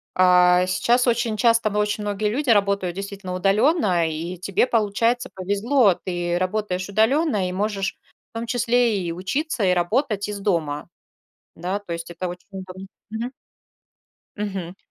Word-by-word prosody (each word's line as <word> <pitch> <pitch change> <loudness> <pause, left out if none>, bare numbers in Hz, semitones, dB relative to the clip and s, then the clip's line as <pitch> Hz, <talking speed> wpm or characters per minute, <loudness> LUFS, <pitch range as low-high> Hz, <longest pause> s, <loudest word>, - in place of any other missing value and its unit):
а, 180 0 +5
сейчас 235 +7 +2
очень 235 -2 +1
часто 230 0 +3
во 210 - -3
очень 210 0 -1
многие 205 +1 -1
люди 265 +3 -2
работают 200 -4 +2
действительно 195 -1 -6
удалённо, 195 - +2
и 170 +3 -5
тебе, 190 +5 +1
получается, 230 +3 +1
повезло. 205 +4 +2
Ты 175 -1 -1
работаешь 185 0 -2
удалённо 220 - +2
и - - -4
можешь 195 +1 -2 0.4
в - - -6
том 230 - -4
числе 240 -2 +2
и 170 -2 -3
учиться, 215 - -2
и 185 -1 +4
работать 205 +3 0
из 205 -1 -5
дома. 165 -7 -1 0.7
Да, 185 +4 -2
то 200 -4 -8
есть 170 0 -5
это 175 +1 -4
очень 180 0 -9
удобно, 190 0 -8 0.2
мгм. 235 +4 -4 1.0
Мгм. 190 -4 -4
200 Hz, 150 wpm, -23 LUFS, 180-225 Hz, 1.0 s, а